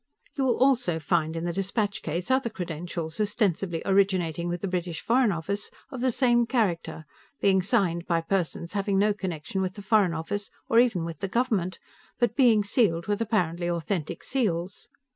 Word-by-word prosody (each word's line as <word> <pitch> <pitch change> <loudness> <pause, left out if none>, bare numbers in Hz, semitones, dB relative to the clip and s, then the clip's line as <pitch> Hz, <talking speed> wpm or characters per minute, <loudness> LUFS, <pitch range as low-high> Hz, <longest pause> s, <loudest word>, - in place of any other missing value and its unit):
You 270 - 0
will 245 - +2
also 250 -10 +3
find 160 0 0
in 165 - -3
the 175 - -1
dispatch 200 +2 -1
case 170 +8 -3
other 260 -2 +2
credentials, 170 -3 -5
ostensibly 195 -5 0
originating 185 -4 +2
with 175 0 -3
the 200 - -2
British 180 -3 -3
Foreign 240 -1 +3
Office, 195 +4 -3 0.2
of 260 -3 -6
the 255 0 +2
same 240 -1 +3
character, 185 -10 -1 0.3
being 190 -1 +3
signed 180 -5 +1
by 170 -2 +1
persons 170 -1 -2
having 200 -1 0
no 205 +1 +3
connection 185 -2 -4
with 185 0 -2
the 205 - -9
Foreign 195 -4 +3
Office, 200 +6 -4 0.2
or 230 - +4
even 225 -9 +2
with 165 -1 -6
the 195 - -2
government, 195 -5 0 0.4
but 240 -2 +1
being 235 -6 +5
sealed 200 -6 +2
with 205 +1 -1
apparently 175 -6 0
authentic 170 -1 -3
seals. 185 -8 -2
190 Hz, 175 wpm, -27 LUFS, 170-220 Hz, 0.4 s, being